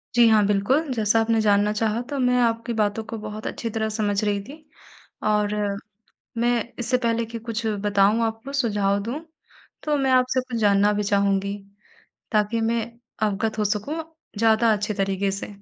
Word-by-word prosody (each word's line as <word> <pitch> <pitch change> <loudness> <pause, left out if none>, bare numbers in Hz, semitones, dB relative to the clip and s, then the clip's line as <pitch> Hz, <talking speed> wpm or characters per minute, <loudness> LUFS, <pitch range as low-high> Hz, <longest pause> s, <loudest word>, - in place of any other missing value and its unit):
जी 235 -1 +7
हाँ, 215 -2 +5
बिल्कुल 255 +9 +1
जैसा 220 -1 +2
आपने 225 0 +2
जानना 205 0 +3
चाहा 220 +2 0
तो 285 - -3
मैं 250 -1 +2
आपकी 230 0 0
बातों 210 +1 0
को 225 +1 -6
बहुत 215 0 -6
अच्छी 230 - -4
तरह 220 0 -2
समझ 210 -1 -1
रही 205 -1 0
थी, 285 +8 -11 0.7
और 210 -1 +1 0.8
मैं 240 +1 +2 0.3
इससे 245 +2 +1
पहले 235 -1 0
की 230 +1 -7
कुछ 230 0 -4 0.2
बताऊँ 205 +2 +3
आपको 225 +5 -5
सुझाव 205 -6 +1
दूँ। 245 +7 -4 0.6
तो 300 -1 +1
मैं 265 -1 +1
आपसे 255 0 +3
कुछ 250 -2 -5
जानना 205 0 +4
भी 210 0 -1
चाहूँगी, 200 0 +1 0.7
ताकि 215 +1 +1
मैं 230 +1 +1 0.5
अवगत 215 +2 -2
हो 210 - +1
सकूँ 210 +9 -1 0.4
ज़्यादा 225 +1 +4
अच्छे 210 +1 -2
तरीक़े 195 0 0
से। 195 - -5
220 Hz, 170 wpm, -24 LUFS, 205-235 Hz, 0.8 s, जी